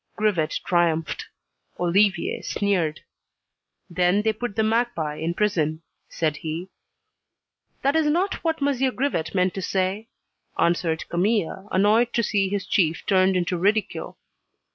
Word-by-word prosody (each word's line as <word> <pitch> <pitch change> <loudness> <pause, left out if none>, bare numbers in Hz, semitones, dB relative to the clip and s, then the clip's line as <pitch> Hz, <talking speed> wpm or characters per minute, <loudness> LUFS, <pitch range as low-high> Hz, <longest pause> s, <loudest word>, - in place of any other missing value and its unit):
Grivet 185 -8 0
triumphed. 165 -3 0 0.5
Olivier 190 +1 +2
sneered. 180 -7 -1 0.9
"Then, 180 +3 +2
they 220 0 +2
put 215 -1 -5
the 220 - +2
magpie 220 -10 0
in 165 +2 -2
prison," 165 -7 0 0.3
said 155 -3 -1
he. 165 +4 -5 1.1
"That 275 +2 +2
is 320 -1 +3
not 355 +6 0
what 320 -3 0
M. 265 -3 +1
Grivet 195 - -1
meant 185 -1 +2
to 195 - -4
say," 190 +4 -1 0.5
answered 170 -1 +1
Camille, 190 +1 0
annoyed 215 +5 +3
to 235 - +1
see 200 -3 +1
his 200 -1 -2
chief 165 -4 +1
turned 190 -1 +3
into 180 0 -1
ridicule. 210 +4 0
190 Hz, 130 wpm, -24 LUFS, 170-220 Hz, 1.1 s, is